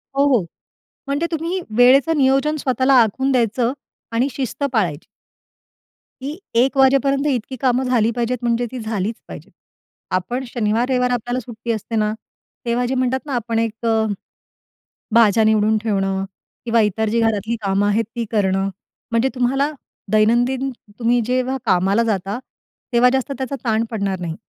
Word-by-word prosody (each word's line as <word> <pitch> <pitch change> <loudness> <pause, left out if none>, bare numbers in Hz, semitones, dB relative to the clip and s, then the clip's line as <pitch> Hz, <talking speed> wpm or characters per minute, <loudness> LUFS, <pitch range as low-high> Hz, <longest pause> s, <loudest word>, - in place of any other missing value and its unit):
हो, 280 +1 +3
हो, 255 -6 +3 0.7
म्हणजे 285 +4 0
तुम्ही 335 +3 -2 0.2
वेळेचं 270 +6 +5
नियोजन 275 +3 +2
स्वतःला 260 0 +2
आखून 265 +5 0
द्यायचं 240 0 +1 0.4
आणि 240 +4 +1
शिस्त 260 +2 -3
पाळायची. 175 - 0 1.2
की 270 - -4 0.3
1:00 260 +4 +3
वाजेपर्यंत 275 +1 +3
इतकी 260 -2 -2
कामं 255 0 +2
झाली 230 -3 +2
पाहिजेत, 240 +1 -1
म्हणजे 240 0 +1
ती 255 - -5
झालीच 220 -1 -2
पाहिजेत. - - -10 0.7
आपण 240 +8 -3
शनिवार-रविवार 245 +2 0
आपल्याला 245 +1 -1
सुट्टी 235 -1 -6
असते 225 +1 -4
ना, 215 -1 +1 0.5
तेव्हा 240 +1 0
जे 260 +2 -1
म्हणतात 255 0 +1
ना, 285 - -5
आपण 230 -1 -1
एक 225 0 -3
अ, 225 -1 +2 1.1
भाज्या 225 -1 +5
निवडून 215 0 +3
ठेवणं 195 -3 0 0.4
किंवा 230 -1 +3
इतर 215 +1 0
जी 230 +2 +1
घरातली 225 0 0
कामं 200 0 +1
आहेत 210 +2 +2
ती 235 -1 -2
करणं, 195 -2 +1 0.4
म्हणजे 230 +3 +2
तुम्हाला 270 +4 +1 0.4
दैनंदिन 240 +5 +2 0.3
तुम्ही 240 +1 +2
जेव्हा 255 +2 0
कामाला 195 +5 +2
जाता. 205 -1 -2 0.5
तेव्हा 240 +1 +5
जास्त 265 +1 -1
त्याचा 265 +1 -3
ताण 220 -1 +2
पडणार 200 -4 -2
नाही, 170 -2 -4
235 Hz, 145 wpm, -20 LUFS, 220-260 Hz, 1.2 s, वेळेचं